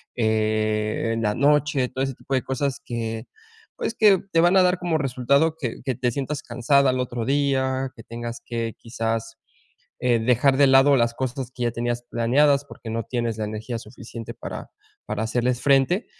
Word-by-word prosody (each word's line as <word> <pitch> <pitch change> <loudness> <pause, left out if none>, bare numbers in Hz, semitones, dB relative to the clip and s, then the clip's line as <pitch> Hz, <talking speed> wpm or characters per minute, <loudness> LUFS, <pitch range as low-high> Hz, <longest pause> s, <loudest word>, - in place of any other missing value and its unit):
eh, 110 -1 0
en 115 - -2
la 105 0 +1
noche, 145 -1 +2
todo 130 - -2
ese 135 0 -2
tipo 135 - -7
de 130 - +2
cosas 135 +1 -2
que, 115 -1 -4 0.5
pues, 225 - -2
que 200 -4 +5
te 165 - +4
van 175 +2 +4
a 185 - +6
dar 180 0 +2
como 170 -3 0
resultado 140 +4 +1
que 120 -7 -4
que 130 -3 -1
te 125 0 0
sientas 140 +2 -4
cansada 130 +3 +2
al 130 - -2
otro 120 -2 -3
día, 135 -1 +1
que 115 - -12
tengas 115 +1 -7
que 115 -1 -3
quizás, 115 -1 -3 0.6
eh, 120 -2 +2
dejar 125 +3 +3
de 140 0 +5
lado 135 +1 +6
las 115 -1 +2
cosas 130 0 -4
que 125 - -3
ya 120 - 0
tenías 120 0 -2
planeadas, 140 +5 +3
porque 130 -4 -11
no 115 +1 -2
tienes 120 -2 -2
la 110 - -1
energía 110 +3 -4
suficiente 115 0 -9
para - - -7 0.4
para 105 +1 -2
hacerles 120 +2 0
frente. 140 - +3
125 Hz, 185 wpm, -24 LUFS, 115-140 Hz, 0.6 s, a